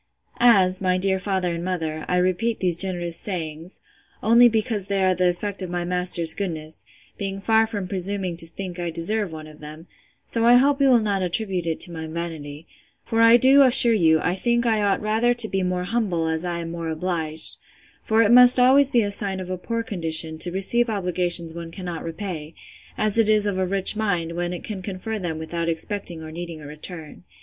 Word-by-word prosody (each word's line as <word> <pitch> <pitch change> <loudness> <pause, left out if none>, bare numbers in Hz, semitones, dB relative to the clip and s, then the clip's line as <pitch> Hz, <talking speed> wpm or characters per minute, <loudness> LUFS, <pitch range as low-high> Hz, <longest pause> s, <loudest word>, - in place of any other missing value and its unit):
As, 195 -6 +3
my 185 -1 +1
dear 190 0 -1
father 185 -2 -2
and 170 0 -5
mother, 160 -4 -4
I 180 - 0
repeat 185 +6 0
these 180 -3 0
generous 175 -2 +2
sayings, 165 -2 -6 0.4
only 235 +2 +5
because 215 -3 -2
they 195 -1 0
are 185 0 +3
the 180 0 +1
effect 195 +3 -4
of 185 - -5
my 175 0 -3
master's 180 -2 +3
goodness, 160 -5 -6 0.4
being 195 -1 -4
far 220 +2 +2
from 205 -4 -5
presuming 190 -1 -3
to 165 -1 +1
think 180 +1 -8
I 175 -1 -3
deserve 175 +4 -1
one 155 -1 -9
of 155 0 -15
them; 155 +2 -11 0.4
so 230 - -2
I 240 +1 +6
hope 275 +3 +3
you 275 - +4
will 250 - +5
not 205 -3 -1
attribute 180 -1 -3
it 160 - -2
to 175 - +2
my 160 -1 -7
vanity; 160 -2 -7 0.4
for 225 0 -1
I 230 +1 +7
do 265 +3 +5
assure 250 -3 +7
you, 160 -6 +3
I 175 - 0
think 235 +5 -1
I 220 -2 +1
ought 200 -1 0
rather 225 +3 +1
to 235 -2 0
be 195 -2 -2
more 180 0 -2
humble, 185 -5 -2
as 160 +1 -2
I 175 -1 -4
am 165 0 -7
more 170 -1 -6
obliged: 160 -1 -1 0.5
for 225 +1 +2
it 215 - +2
must 250 +1 +9
be - - +3
always 275 +1 +4
a 210 -4 +2
sign 195 -1 -3
of 185 0 -7
a 185 - -3
poor 230 +4 -4
condition, 160 -5 0
to 175 - +2
receive 230 +6 +1
obligations 180 -4 0
one 170 0 -8
cannot 175 -1 -7
repay; 165 -2 -7 0.4
as 215 +1 0
it 220 -1 +3
is 215 -1 +3
of 200 -2 -2
a 185 - -1
rich 195 +2 +1
mind, 180 -6 -2
when 175 +1 -4
it 180 - -7
can 205 -3 -6
confer 205 +3 -6
them 170 -4 -4
without 170 +1 -4
expecting 170 -1 -3
or 155 - -9
needing 170 -1 -8
a 150 - -12
return. 155 +2 -10
185 Hz, 210 wpm, -22 LUFS, 170-215 Hz, 0.5 s, must